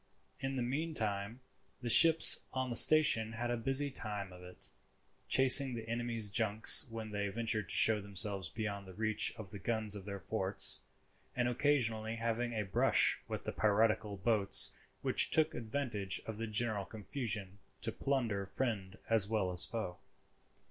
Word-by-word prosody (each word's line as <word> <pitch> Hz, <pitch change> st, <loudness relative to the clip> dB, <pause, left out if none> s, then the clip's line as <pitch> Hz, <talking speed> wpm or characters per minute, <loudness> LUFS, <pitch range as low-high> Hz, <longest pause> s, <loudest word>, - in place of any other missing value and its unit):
In 135 Hz, 0 st, -6 dB
the 125 Hz, -, -4 dB
meantime 120 Hz, -6 st, -5 dB, 0.4 s
the -, -, -6 dB
ships 165 Hz, +7 st, +8 dB
on 130 Hz, -1 st, -5 dB
the -, -, -4 dB
station 145 Hz, -7 st, +5 dB
had 120 Hz, +1 st, -6 dB
a -, -, -2 dB
busy 135 Hz, +4 st, -2 dB
time 105 Hz, -6 st, -7 dB
of 90 Hz, -, -16 dB
it; 90 Hz, 0 st, -13 dB, 0.6 s
chasing 135 Hz, 0 st, +7 dB
the 115 Hz, -1 st, -10 dB
enemy's 115 Hz, -2 st, -4 dB
junks 110 Hz, +3 st, +3 dB
when 110 Hz, -1 st, -10 dB
they 100 Hz, -1 st, -5 dB
ventured 110 Hz, -2 st, -4 dB
to -, -, -3 dB
show 110 Hz, -2 st, +2 dB
themselves 100 Hz, -2 st, -1 dB
beyond 100 Hz, 0 st, -8 dB
the 95 Hz, -, -14 dB
reach 110 Hz, 0 st, -1 dB
of 110 Hz, -4 st, -10 dB
the 100 Hz, -, -10 dB
guns 110 Hz, 0 st, -3 dB
of 100 Hz, -1 st, -12 dB
their 100 Hz, -1 st, -8 dB
forts; 95 Hz, -1 st, -2 dB, 0.5 s
and 125 Hz, -1 st, -2 dB
occasionally 120 Hz, -5 st, -2 dB
having 115 Hz, +1 st, -5 dB
a 105 Hz, -2 st, -5 dB
brush 95 Hz, -, +1 dB
with -, -, -8 dB
the -, -, -6 dB
piratical 110 Hz, -1 st, -2 dB
boats 100 Hz, 0 st, +4 dB, 0.3 s
which -, -, +1 dB
took 155 Hz, 0 st, +3 dB
advantage 110 Hz, -5 st, -5 dB
of 110 Hz, -1 st, -9 dB
the 115 Hz, +1 st, -6 dB
general 110 Hz, -2 st, -1 dB
confusion 105 Hz, -2 st, -7 dB, 0.2 s
to -, -, -3 dB
plunder 120 Hz, -8 st, -4 dB
friend 100 Hz, -1 st, -7 dB
as 110 Hz, -3 st, +2 dB
well 105 Hz, -4 st, -4 dB
as 90 Hz, -, +1 dB
foe. 110 Hz, -6 st, -8 dB
110 Hz, 160 wpm, -31 LUFS, 100-120 Hz, 0.6 s, ships